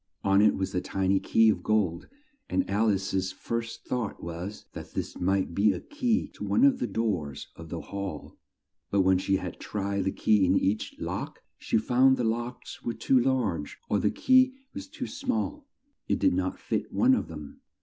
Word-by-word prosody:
On 100 Hz, 0 st, +4 dB
it 105 Hz, -, +5 dB
was 95 Hz, -, -3 dB
a 90 Hz, -, 0 dB
ti 95 Hz, -1 st, -2 dB
ny 95 Hz, 0 st, +4 dB
key 110 Hz, +2 st, +4 dB
of -, -, +1 dB
gold, 100 Hz, -6 st, 0 dB, 0.4 s
and 275 Hz, -, 0 dB
Al 110 Hz, +2 st, +2 dB
ice's 95 Hz, -1 st, 0 dB
first 115 Hz, 0 st, -5 dB
thought 120 Hz, -5 st, -3 dB
was 85 Hz, +5 st, -6 dB
that -, -, -9 dB
this -, -, -4 dB
might 95 Hz, -1 st, +1 dB
be 100 Hz, +2 st, +3 dB
a -, -, -4 dB
key 250 Hz, -6 st, -1 dB
to -, -, -10 dB
one 245 Hz, -, +2 dB
of 275 Hz, -2 st, +5 dB
the -, -, -1 dB
doors 80 Hz, -11 st, -2 dB
of 85 Hz, -1 st, -11 dB
the 85 Hz, -, -4 dB
hall, 100 Hz, -6 st, -6 dB, 0.5 s
but 100 Hz, -, +3 dB
when 95 Hz, 0 st, +4 dB
she 95 Hz, +1 st, +1 dB
had 90 Hz, -2 st, -4 dB
tried 100 Hz, -2 st, -2 dB
the 95 Hz, -, +1 dB
key 105 Hz, 0 st, +3 dB
in 95 Hz, +1 st, +4 dB
each 100 Hz, +3 st, -1 dB
lock, -, -, -5 dB
she -, -, 0 dB
found 130 Hz, +4 st, +4 dB
the 125 Hz, -, -1 dB
locks 120 Hz, +2 st, -3 dB
were 120 Hz, -, -3 dB
too 130 Hz, +3 st, +3 dB
large 120 Hz, -, 0 dB
or -, -, +2 dB
the -, -, +2 dB
key 260 Hz, 0 st, +4 dB, 0.2 s
was 285 Hz, 0 st, -7 dB
too 285 Hz, -3 st, -6 dB
small 280 Hz, +2 st, -3 dB, 0.4 s
it -, -, +1 dB
did -, -, +3 dB
not -, -, -1 dB
fit -, -, -3 dB
one 260 Hz, +2 st, +4 dB
of 255 Hz, -, 0 dB
them. 75 Hz, -3 st, -10 dB
105 Hz, 200 wpm, -28 LUFS, 95-130 Hz, 0.5 s, it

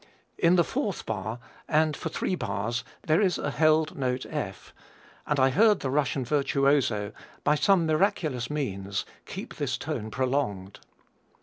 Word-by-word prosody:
In 170 Hz, +1 st, +5 dB
the 175 Hz, -, +5 dB
fourth 210 Hz, -, -3 dB
bar 110 Hz, +1 st, -3 dB, 0.3 s
and 155 Hz, 0 st, +2 dB
for -, -, -4 dB
three -, -, -2 dB
bars 115 Hz, -, -2 dB, 0.2 s
there 155 Hz, +5 st, +3 dB
is 185 Hz, -5 st, +2 dB
a 145 Hz, -, -2 dB
held 155 Hz, +1 st, +3 dB
note 130 Hz, -2 st, -1 dB
F, -, -, -5 dB, 0.5 s
and 150 Hz, -1 st, +1 dB
I 130 Hz, 0 st, +4 dB
heard 210 Hz, -, +4 dB
the 135 Hz, -, -2 dB
Russian 140 Hz, -2 st, 0 dB
virtuoso, 140 Hz, -6 st, +2 dB, 0.3 s
by 150 Hz, -, +4 dB
some 175 Hz, +3 st, +3 dB
miraculous 155 Hz, -, +1 dB
means, 100 Hz, -10 st, -3 dB, 0.2 s
keep -, -, -7 dB
this -, -, -1 dB
tone 110 Hz, -, -4 dB
prolonged. 125 Hz, -6 st, -2 dB
140 Hz, 145 wpm, -27 LUFS, 120-155 Hz, 0.5 s, In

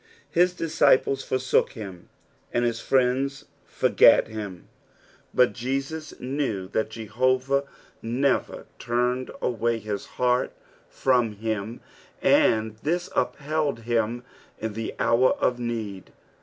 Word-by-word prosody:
His 180 Hz, +1 st, +3 dB
dUciplea 145 Hz, -5 st, +3 dB
fonook 130 Hz, 0 st, +1 dB
him, 100 Hz, -7 st, -9 dB, 0.4 s
koA 120 Hz, -, +1 dB
bis 120 Hz, -1 st, 0 dB
friends 135 Hz, +3 st, +1 dB, 0.2 s
forgat -, -, +5 dB
tiim, 105 Hz, -5 st, -6 dB, 0.7 s
but 125 Hz, -1 st, +3 dB
Jesns 135 Hz, +5 st, -4 dB
knew 125 Hz, -8 st, -2 dB
that 110 Hz, +1 st, -1 dB
Jehovah 130 Hz, +5 st, 0 dB, 0.4 s
nerer 130 Hz, +4 st, 0 dB
turned 125 Hz, +1 st, 0 dB, 0.2 s
awaj 115 Hz, -1 st, 0 dB
his 105 Hz, -1 st, -4 dB
heart 125 Hz, 0 st, +1 dB, 0.4 s
from 125 Hz, -5 st, +1 dB
him, 110 Hz, +1 st, -4 dB, 0.4 s
and 110 Hz, -1 st, +3 dB
this 170 Hz, +9 st, -2 dB
upheld 150 Hz, -3 st, -1 dB
him 115 Hz, +1 st, -1 dB, 0.3 s
in 110 Hz, -1 st, -4 dB
the 115 Hz, +1 st, -5 dB
hour 125 Hz, +3 st, +3 dB
of 125 Hz, -1 st, 0 dB
need. 110 Hz, -5 st, -4 dB
120 Hz, 110 wpm, -25 LUFS, 110-135 Hz, 0.7 s, forgat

